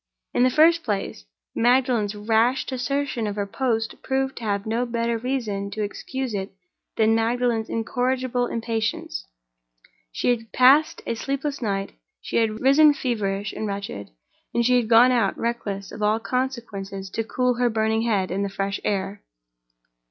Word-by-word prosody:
In - - +2
the 255 - +5
first 330 +5 +4
place, 195 - -3 0.3
Magdalen's 240 -3 +2
rash 225 +5 +2
desertion 260 -2 -2
of 205 - -3
her 205 -1 -1
post 225 +1 -2
proved 265 0 -1
to - - -7
have 200 -2 -1
no 225 +2 0
better 235 -1 -1
reason 220 -6 -2
to 215 +1 -3
excuse 260 +4 -4
it 195 0 -3 0.5
than 220 0 +4
Magdalen's 230 0 +1
incorrigible 250 +2 -1
impatience: 225 - -3 0.8
she - - -1
had 225 -2 -14
passed 275 +5 +5
a - - -1
sleepless 275 +4 -3
night; 195 -3 -2 0.3
she - - -3
had 220 -1 +1
risen 290 +3 +6
feverish 205 -6 -2
and 215 - -3
wretched; 200 - -5 0.5
and 235 - +2
she 250 +1 +4
had 235 -3 0
gone 240 +2 +7
out, 230 -6 +1
reckless 210 -4 -3
of 215 - -8
all 210 +1 +2
consequences, 225 -7 -4
to 225 - -2
cool 250 +2 0
her 245 -1 +3
burning 220 0 +1
head 205 -6 0
in 195 +2 -1
the 200 - -1
fresh 195 +1 -3
air. 195 0 -2
225 Hz, 160 wpm, -24 LUFS, 205-250 Hz, 0.8 s, gone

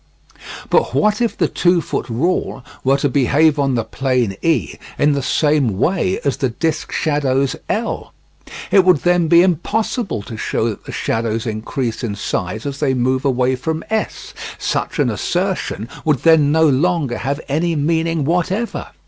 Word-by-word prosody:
But - - +2
what 215 +1 +2
if 235 - 0
the - - +2
two 175 0 +2
foot 160 - -4
rule 135 0 -1 0.2
were 135 +1 +3
to 140 - +1
behave 145 +3 +3
on 135 -2 +1
the 115 - 0
plane 125 -3 -1
E 165 -1 +1 0.2
in 145 - +3
the 140 -1 0
same 140 -5 +1
way 185 - +1
as 140 - 0
the 130 - 0
disc 155 +6 -2
shadows 140 -3 0
L'? 230 +2 -2 0.6
It 195 - +6
would 180 -5 +3
then 175 -1 +3
be 170 +2 +6
impossible 195 - -1
to 110 - -8
show 110 - -1
that 105 - -7
the - - -7
shadows 115 0 -2
increase 115 +2 -3
in 105 -4 -2
size 100 +2 -3
as 140 0 -4
they 135 -3 +1
move 130 +2 0
away 130 -1 +2
from 160 +5 -3
S; 220 -1 -3 0.2
such - - -2
an - - +2
assertion 180 - -2 0.2
would 150 -5 +1
then 160 -3 +5
no 160 +1 +4
longer 145 -2 +1
have 140 +2 -2
any 165 +4 0
meaning 160 0 0
whatever. 180 +8 -1
145 Hz, 165 wpm, -18 LUFS, 130-170 Hz, 0.6 s, It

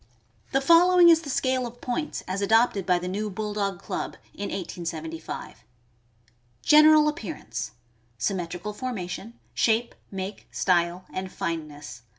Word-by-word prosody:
The 270 - +2
following 345 +3 +7
is 325 -1 +6
the 300 - -8
scale 260 -1 0
of 240 +1 -12
points 255 +5 -3
as 190 +2 -2
adopted 220 -2 +3
by 180 -1 +4
the 175 +1 -4
New 210 +3 -2
Bulldog 205 -2 -2
Club - - -4 0.2
in 200 - -5
1875: 165 -3 -6 1.0
General 305 0 +7
appearance. 260 - -4 0.2
— 115 +1 -38
Symmetrical 180 +1 -3
formation; 220 -2 -5 0.2
shape, 230 +1 +1 0.2
make, 195 +1 -6
style, 175 0 +1
and 185 0 -4
fineness. 150 -6 -5
200 Hz, 130 wpm, -26 LUFS, 175-250 Hz, 1.0 s, following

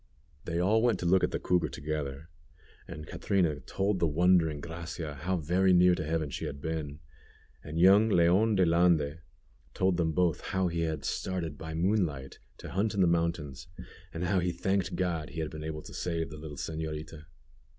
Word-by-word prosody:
They 85 0 -2
all 100 +6 +3
went 120 -4 +2
to - - -3
look 95 +2 +4
at - - +3
the - - -2
cougar 90 -1 +1
together, 75 -1 -4 0.6
and 75 -2 -8
Catrina 85 -3 0
told 95 +8 -1
the 85 - +2
wondering 80 -1 +3
Gracia 85 -1 -6
how 85 +7 -2
very 90 +4 +2
near 90 0 +6
to 85 - -2
heaven 80 -2 -2
she - - -4
had 70 - -5
been, 80 -1 -4 0.6
and 75 +2 -6
young 100 +5 +6
Leon 95 +4 +4
De 95 -2 +4
Lande 85 -3 +2 0.6
told 95 -1 +2
them 80 -2 +1
both 85 0 +1
how 95 -2 -1
he 85 0 -3
had 80 -3 -2
started 85 -5 -3
by 80 +1 -7
moonlight 80 -7 -1 0.2
to - - -9
hunt 105 +3 0
in 100 - +2
the - - +6
mountains, 85 -5 -1 0.4
and 85 +1 -4
how 95 +1 +2
he 90 0 0
thanked 95 +2 -1
God 85 -4 -2
he 80 - -7
had 80 -1 -3
been 75 0 -7
able 75 -1 -5
to - - -11
save 85 -2 -3
the 75 - -8
little 75 -2 -8
señorita. 80 0 -5
85 Hz, 190 wpm, -30 LUFS, 75-90 Hz, 0.6 s, near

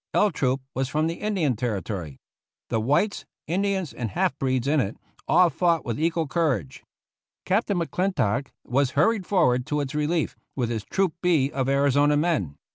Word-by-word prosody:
L 210 - +4
Troop 135 -4 0
was 130 0 -1
from 155 +2 0
the 165 +1 -3
Indian 185 - 0
Territory. 100 - -4 0.5
The 115 - +1
whites, 150 - +1 0.2
Indians, 190 -1 -1
and 120 -3 -4
half 100 - 0
breeds 130 -1 0
in 150 +1 +3
it, 105 -4 -2 0.3
all 175 +1 +5
fought 170 +1 +1
with 115 +1 -3
equal 165 0 0
courage. 135 - -1 0.6
Captain 200 0 +1
McClintock 165 - 0 0.2
was 135 +1 +1
hurried 195 +4 +2
forward 130 -10 +2
to 150 -1 0
its 140 -1 -3
relief 150 +2 0 0.2
with 120 -3 -1
his 110 -3 -2
Troop 190 -4 0
B 155 -6 +2
of 135 -1 -1
Arizona 140 +1 +3
men. 145 - 0
145 Hz, 165 wpm, -25 LUFS, 125-170 Hz, 0.6 s, all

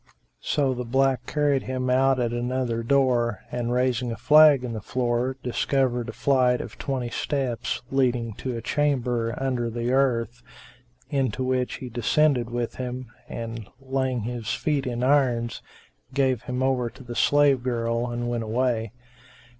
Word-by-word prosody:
'" - - -47 0.2
So 140 -3 +2
the 125 0 -4
black 130 0 +1
carried 145 -3 +1
him 130 0 -3
out 130 +1 +3
at 120 -1 0
another 120 -1 -1
door 120 -4 +2
and, 120 -1 -2
raising 125 -1 +1
a 115 - -5
flag 150 -3 +6
in 120 -2 -4
the 110 - -5
floor, 125 +2 -1
discovered 125 -1 0
a - - -3
flight 125 -3 +2
of - - -8
twenty 130 -3 -3
steps 130 -5 -2
leading 125 -4 +1
to 125 -3 -3
a 115 - -6
chamber[FN#382] 125 -6 0
under 125 -3 -1
the 120 +1 -2
earth, 125 -3 +1 0.7
into 130 -3 0
which 130 -1 0
he 130 - -7
descended 120 +1 +2
with 120 -1 -3
him 125 -1 -5 0.2
and, 115 -3 -6
laying 130 -2 -1
his 115 0 -4
feet 145 -4 -1
in 120 0 -2
irons, 125 -4 +2 0.5
gave 130 -3 +2
him 125 +1 -2
over 130 -3 +1
to 130 - -14
the 120 -1 -7
slave 145 0 +4
girl 120 -1 -1
and 120 0 -3
went 120 -1 -1
away. 115 -1 -1
125 Hz, 160 wpm, -25 LUFS, 120-130 Hz, 0.7 s, flag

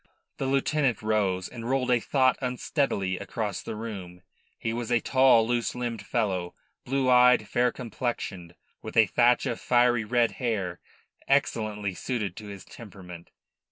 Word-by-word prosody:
The 135 - -2
lieutenant 135 -3 +1
rose, 100 -4 0
and 120 -1 -7
rolled 130 -1 +1
a 120 - +4
thought 130 +2 +2
unsteadily 125 - -1
across 105 -5 -4
the - - -6
room. 95 -5 -7 0.3
He 115 - -3
was 120 0 -4
a 120 - +4
tall, 130 -4 +4
loose 120 -1 -1
limbed 120 -4 -4
fellow, 95 -6 -2 0.3
blue 135 0 0
eyed, 125 0 +5
fair 125 0 +1
complexioned, 110 -8 -5 0.3
with - - -7
a 110 - +7
thatch 120 +4 +3
of 115 - -2
fiery 120 -2 +3
red 120 +1 +2
hair 100 -8 -2 0.5
excellently 110 -7 0
suited 105 -3 -3
to 105 - -8
his 100 -2 -9
temperament. 90 -6 -12
115 Hz, 150 wpm, -27 LUFS, 100-125 Hz, 0.5 s, a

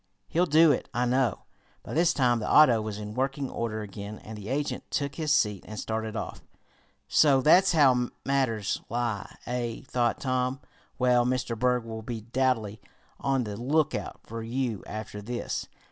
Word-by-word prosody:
He'll 175 +2 +1
do 160 +1 +6
it, 135 - -1
I 120 +1 +2
know." 125 0 +1 0.4
By - - -7
this 165 +2 +4
time 120 -3 +2
the 105 - -3
auto 125 -7 +7
was 105 -1 -4
in 105 0 -6
working 135 +2 -2
order 110 -2 -3
again, 105 +1 -7
and 110 +1 -10
the 105 0 -8
agent 145 +2 -2
took 140 -1 -1
his 155 -1 -2
seat 105 -9 +2
and 110 0 -6
started 110 -1 -3
off. - - -5 0.7
"So 140 -3 +5
that's 175 +8 +5
how 130 -6 +4 0.2
matters 125 -7 0
lie, 115 -3 -2
eh?" 120 -2 -3
thought 120 -1 0
Tom. 130 0 -1 0.4
"Well, 125 -2 +4
Mr. 125 -1 -1
Berg, 125 +1 +1
we'll 110 -1 -6
be 115 0 -5
doubly 115 -3 -1 0.4
on 135 -2 +1
the 105 -2 -5
lookout 145 +7 -1
for 115 +1 -6
you 115 -2 -2
after 105 -1 -6
this. 120 +3 -4
125 Hz, 170 wpm, -28 LUFS, 110-135 Hz, 0.7 s, auto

